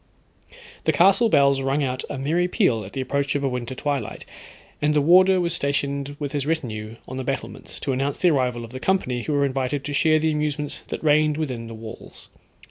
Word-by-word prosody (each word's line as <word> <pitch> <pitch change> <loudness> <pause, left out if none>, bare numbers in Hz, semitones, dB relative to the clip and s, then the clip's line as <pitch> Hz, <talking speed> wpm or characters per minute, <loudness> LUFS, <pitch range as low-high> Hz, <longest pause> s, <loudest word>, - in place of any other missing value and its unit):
The - - +4
castle 195 +6 +4
bells 140 -5 +4
rung 135 +2 0
out 130 -1 -2
a - - -4
merry 160 +7 +1
peal 115 -10 +1
at 95 - -10
the 135 - -2
approach 140 +2 -1
of 140 - -1
a - - +2
winter 125 0 -4
twilight, 140 -5 -3 0.6
and 150 +1 +2
the - - +5
warder 185 +5 +5
was 170 -1 0
stationed 140 -2 -1
with 145 -2 -4
his 145 -1 -2
retinue 115 -9 -3
on 130 - -6
the 130 - -3
battlements, 135 +1 -5
to 140 - -1
announce 135 +2 -1
the 180 - +4
arrival 125 -4 0
of 115 - -13
the 130 - -6
company 130 -9 0
who 150 - -3
were 140 -1 +3
invited 135 +1 -2
to 145 +1 -4
share 155 +2 +4
the 160 0 +1
amusements 150 -1 -2
that - - -5
reigned 150 0 +3
within 130 -7 -3
the 115 - -8
walls. 110 0 -11
140 Hz, 210 wpm, -23 LUFS, 130-150 Hz, 0.6 s, the